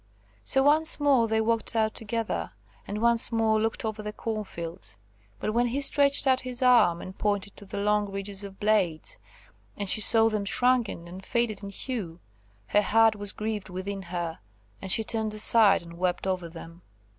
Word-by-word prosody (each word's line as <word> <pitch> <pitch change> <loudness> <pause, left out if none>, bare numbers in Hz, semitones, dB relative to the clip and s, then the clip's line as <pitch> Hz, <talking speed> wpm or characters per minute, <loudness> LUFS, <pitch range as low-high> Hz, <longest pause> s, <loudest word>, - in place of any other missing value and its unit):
So 270 - +1
once 310 +3 +3
more 275 -5 +3
they 220 0 0
walked 230 0 -1
out 220 -1 +1
together, 225 0 -4 0.4
and 210 +2 -4
once 235 0 +4
more 220 -1 +1
looked 225 +1 -2
over 215 -1 -4
the 210 0 -5
corn 215 0 -4
fields; 170 - -9 0.4
but 215 - -3
when 240 +1 +2
he 250 +4 -2
stretched 280 0 +3
out 260 -1 +3
his 255 0 -4
arm, 235 -9 +4
and 185 - -9
pointed 205 -1 -2
to 205 - -12
the - - -7
long 210 0 0
ridges 195 0 -6
of 195 -1 -10
blades, 205 -7 0 0.6
and 205 - -3
she 215 - +5
saw 225 +1 +6
them 215 -2 -1
shrunken 240 -5 0
and 185 +2 -10
faded 235 -2 -1
in 200 - -7
hue, 200 -6 -5 0.5
her 210 - +3
heart 225 +2 +3
was 205 -1 -3
grieved 215 -2 -5
within 190 +2 -5
her, 170 -2 -5 0.4
and 190 - -4
she 220 - +3
turned 220 -1 -2
aside 215 -3 +4
and 170 0 -13
wept 180 0 -1
over 185 -3 -2
them. 165 +1 -12
215 Hz, 185 wpm, -26 LUFS, 190-230 Hz, 0.6 s, saw